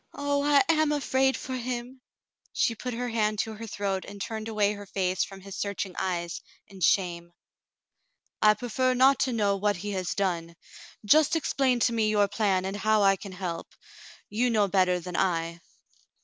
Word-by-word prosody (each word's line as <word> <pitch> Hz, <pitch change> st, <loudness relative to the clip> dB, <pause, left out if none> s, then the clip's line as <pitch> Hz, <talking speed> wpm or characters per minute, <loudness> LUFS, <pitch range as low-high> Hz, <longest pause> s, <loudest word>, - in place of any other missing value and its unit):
"Oh, 285 Hz, 0 st, 0 dB
I 290 Hz, +2 st, +5 dB
am 310 Hz, -2 st, +3 dB
afraid 265 Hz, -2 st, +1 dB
for 260 Hz, -, -6 dB
him." 250 Hz, +1 st, -5 dB, 0.5 s
She 230 Hz, -, +1 dB
put 245 Hz, +2 st, -5 dB
her 245 Hz, +1 st, -3 dB
hand 215 Hz, -2 st, 0 dB
to 220 Hz, -, -5 dB
her 225 Hz, +1 st, -8 dB
throat 195 Hz, -2 st, -2 dB
and 200 Hz, 0 st, -10 dB
turned 220 Hz, +2 st, -4 dB
away 210 Hz, -2 st, +1 dB
her 205 Hz, -1 st, -9 dB
face 185 Hz, -1 st, 0 dB
from 195 Hz, -1 st, -9 dB
his 195 Hz, 0 st, -9 dB
searching 200 Hz, -2 st, -3 dB
eyes, 175 Hz, -2 st, -3 dB, 0.2 s
in 195 Hz, -2 st, -14 dB
shame. 170 Hz, -1 st, +1 dB, 1.1 s
"I 210 Hz, 0 st, +6 dB
prefer 255 Hz, +2 st, 0 dB
not 265 Hz, +2 st, +5 dB
to 260 Hz, -, +1 dB
know 205 Hz, -4 st, +1 dB
what 205 Hz, +1 st, +1 dB
he 205 Hz, +4 st, -5 dB
has 185 Hz, -2 st, -2 dB
done. 170 Hz, -4 st, -2 dB, 0.5 s
Just 310 Hz, +9 st, +5 dB
explain 270 Hz, -5 st, +1 dB
to 235 Hz, -, +3 dB
me 220 Hz, -2 st, +1 dB
your 205 Hz, -1 st, +3 dB
plan, 200 Hz, -3 st, 0 dB
and 195 Hz, +1 st, -3 dB
how 215 Hz, 0 st, +2 dB
I 195 Hz, 0 st, +5 dB
can 195 Hz, 0 st, -9 dB
help. 180 Hz, -3 st, -6 dB, 0.5 s
You 240 Hz, +5 st, 0 dB
know 215 Hz, -3 st, +2 dB
better 185 Hz, -2 st, +2 dB
than 180 Hz, 0 st, -7 dB
I." 170 Hz, -2 st, -1 dB
205 Hz, 180 wpm, -27 LUFS, 190-245 Hz, 1.1 s, I